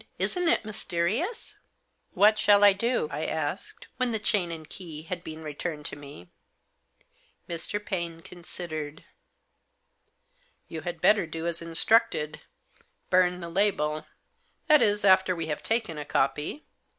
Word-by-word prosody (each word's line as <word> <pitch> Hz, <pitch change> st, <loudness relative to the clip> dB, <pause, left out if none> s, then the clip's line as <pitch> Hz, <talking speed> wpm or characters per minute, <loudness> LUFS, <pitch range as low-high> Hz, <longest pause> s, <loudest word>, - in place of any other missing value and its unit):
" -, -, -42 dB
Isn't 360 Hz, -1 st, 0 dB
it 330 Hz, -, +2 dB
mysterious? 215 Hz, -, -2 dB, 0.2 s
" -, -, -47 dB
" -, -, -44 dB
What 215 Hz, +1 st, +6 dB
shall 205 Hz, -1 st, +5 dB
I 200 Hz, -1 st, +8 dB
do? 230 Hz, -3 st, 0 dB
" -, -, -14 dB
I 150 Hz, -, -3 dB
asked, 160 Hz, +3 st, -3 dB
when 255 Hz, -1 st, +1 dB
the 220 Hz, -, 0 dB
chain 205 Hz, -4 st, +1 dB
and 160 Hz, -2 st, -7 dB
key 160 Hz, -4 st, -8 dB
had 175 Hz, +1 st, -5 dB
been 160 Hz, 0 st, -8 dB
returned 150 Hz, 0 st, -5 dB
to -, -, -4 dB
me. 140 Hz, -12 st, -12 dB, 1.2 s
Mr. 170 Hz, +4 st, -3 dB
Paine 170 Hz, -5 st, -4 dB
considered. 160 Hz, -4 st, -7 dB, 0.8 s
" -, -, -43 dB
You 160 Hz, -, -6 dB
had 175 Hz, +1 st, -5 dB
better 210 Hz, -5 st, +4 dB
do 160 Hz, +1 st, -5 dB
as 170 Hz, 0 st, -1 dB
instructed 165 Hz, -2 st, +2 dB, 0.3 s
— -, -, -35 dB
burn 180 Hz, 0 st, +3 dB
the 170 Hz, -, -6 dB
label; 155 Hz, -6 st, 0 dB, 0.6 s
that 305 Hz, -1 st, +6 dB
is, 205 Hz, -1 st, +3 dB
after 190 Hz, -1 st, +5 dB
we 165 Hz, -1 st, -3 dB
have 150 Hz, -1 st, -3 dB
taken 225 Hz, -9 st, -1 dB
a 150 Hz, -, -5 dB
copy. 150 Hz, -, -1 dB
175 Hz, 160 wpm, -27 LUFS, 155-210 Hz, 1.2 s, I